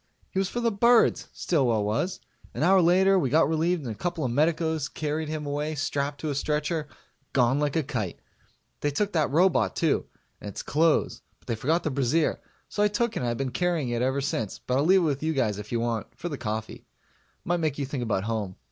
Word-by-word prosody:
He 190 - -1
was 195 -1 0
for 240 - -3
the 230 -1 +2
birds, 235 +3 +4
Stillwell 125 - +1
was. 115 - -1 0.4
An - - -1
hour 190 +2 +5
later 190 +3 +4
we 135 - 0
got 160 +5 +4
relieved 160 +1 0
and 120 - -3
a - - -6
couple 165 +5 -2
of 125 - -1
medicos 160 +2 +1
carried 155 0 -3
him 155 -1 -4
away 150 +2 -2
strapped 145 0 -2
to 155 - -2
a - - -1
stretcher 150 +2 -1 0.5
gone 130 +1 +3
like 150 0 0
a 160 - +2
kite. 115 - -4 0.6
They 145 - 0
took 200 +8 -1
the 155 -4 +2
robot 175 +6 +2
too, 160 -3 +1 0.3
and 105 - -7
its 100 - -6
clothes, 160 +2 +1 0.2
but - - -30
they 115 - -1
forgot 155 +10 0
the 155 - -1
brassiere, 140 +4 +1 0.3
so 205 - -3
I 210 - +5
took 225 +2 -1
it - - -1
and 125 - -1
I 120 - -1
been 135 +1 -2
carrying 165 -1 0
it 120 0 -1
ever 130 +2 +1
since, 115 -7 -2
but 125 - -2
I'll 145 - +2
leave 190 +2 +5
it - - +1
with 145 -4 0
you 160 +1 0
guys 110 -8 0
if 105 0 -9
you 120 - 0
want 115 -1 -3
for 175 - -4
the 145 - -3
coffee. 110 -1 -5 0.6
Might 175 +1 +1
make 155 -4 -1
you 140 - -1
think 135 -1 -4
about 110 -5 -1
home. 105 -4 -3
150 Hz, 230 wpm, -26 LUFS, 125-170 Hz, 0.6 s, hour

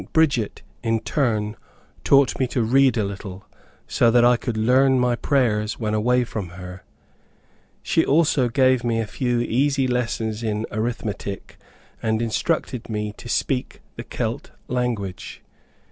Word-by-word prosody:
Bridget, 140 -10 +1 0.2
in 115 -1 0
turn, 110 -5 -1 0.5
taught 140 -1 +4
me 130 - +2
to 120 -1 -1
read 130 +2 +3
a 110 - +1
little, 100 -1 -7 0.4
so 120 - +3
that 120 +1 +5
I 120 0 +6
could 120 -1 -4
learn 130 +4 +4
my 125 -1 +2
prayers 115 -5 0
when 110 -2 -1
away 125 +4 +2
from 105 -6 -5
her. 90 0 -9 1.0
She - - +2
also 145 -4 +2
gave 130 0 +3
me 115 -1 0
a 115 - -1
few 120 +2 -1
easy 135 +3 +1
lessons 115 -3 -2
in 110 -1 -2
arithmetic, 110 -3 -4 0.4
and 110 0 0
instructed 120 +1 -2
me 105 -1 -3
to 120 - -10
speak 130 +1 -1 0.2
the - - -6
Celt - - -4 0.2
language. 115 -7 -3
120 Hz, 145 wpm, -23 LUFS, 110-130 Hz, 1.0 s, I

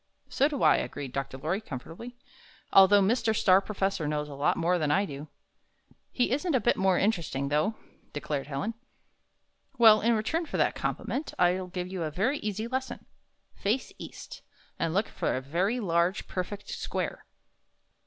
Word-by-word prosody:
''So 280 +2 +3
do 285 -3 -3
I," - - +6
agreed 140 -3 -5
Dr. 135 -1 -4
Lorry, 165 +9 -2
comfortably, 175 - -8 0.6
"although 195 +1 +7
Mr. 225 +2 +1
Star 190 -2 +5
Professor 195 -5 -2
knows 150 0 -2
a 145 - -8
lot 140 +1 +1
more 175 +2 +1
than 155 -2 0
I 195 +7 +3
do." 145 -3 -8 0.8
"He 245 - 0
isn't 295 +4 0
a - - +4
bit 240 - +2
more 190 -1 +2
interesting, 165 -10 0
though," 155 +10 +1 0.4
declared 145 -1 -3
Helen. 150 +10 -3 1.0
"Well, 220 -3 +7
in 235 +1 +3
return 315 +10 -1
for - - -3
that - - +2
compliment, 290 +4 -3
I'll 180 +1 +2
give 180 0 -4
you 185 -1 -5
a 155 -2 -2
yery 230 - 0
easy 215 +1 -3
lesson. 260 +1 -4 0.5
Face 220 +6 -2
east, - - -9 0.4
and 165 - 0
look 205 +3 +2
for - - -2
a - - -1
very 180 - -1
large, 175 -2 0
perfect 195 +3 -5
square." - - -4
190 Hz, 165 wpm, -28 LUFS, 155-225 Hz, 1.0 s, although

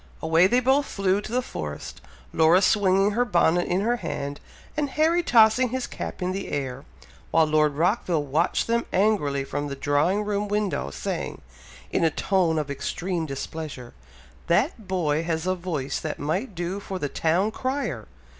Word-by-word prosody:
Away 165 +3 +4
they 245 +5 +3
both 270 +3 +3
flew 195 0 0
to 215 - -8
the 250 +1 0
forest, 75 - -6 0.3
Laura 165 +4 +5
swinging 195 0 +3
her 235 +4 +2
bonnet 175 -5 +2
in 180 +2 +1
her 240 +3 +1
hand, 140 -10 -4 0.4
and 295 -2 -1
Harry 320 +5 +2
tossing 235 -3 +5
his 255 +1 -2
cap - - -6
in 180 - 0
the 195 +1 -4
air, 135 -1 -4 0.4
while 165 -1 +4
Lord 155 -1 +2
Rockville 175 -1 +1
watched 150 +5 +1
them 235 0 0
angrily 180 -9 +1
from 145 +1 -3
the 140 - -5
drawing 145 +9 +1
room 205 0 -1
window, 205 - -1
saying, - - -4 0.5
in - - +1
a 165 - +5
tone 170 0 +1
of 150 -2 -2
extreme 170 +4 -3
displeasure, 140 -2 -6 0.5
"That 215 - +1
boy 160 -5 0
has 165 0 -2
a 185 - +2
voice 170 -7 -3
that 155 - -4
might 185 - -2
do 175 +3 -3
for 195 -1 -5
the 145 - -2
town 170 +9 +1
crier! 240 - -3
180 Hz, 170 wpm, -25 LUFS, 150-210 Hz, 0.5 s, Laura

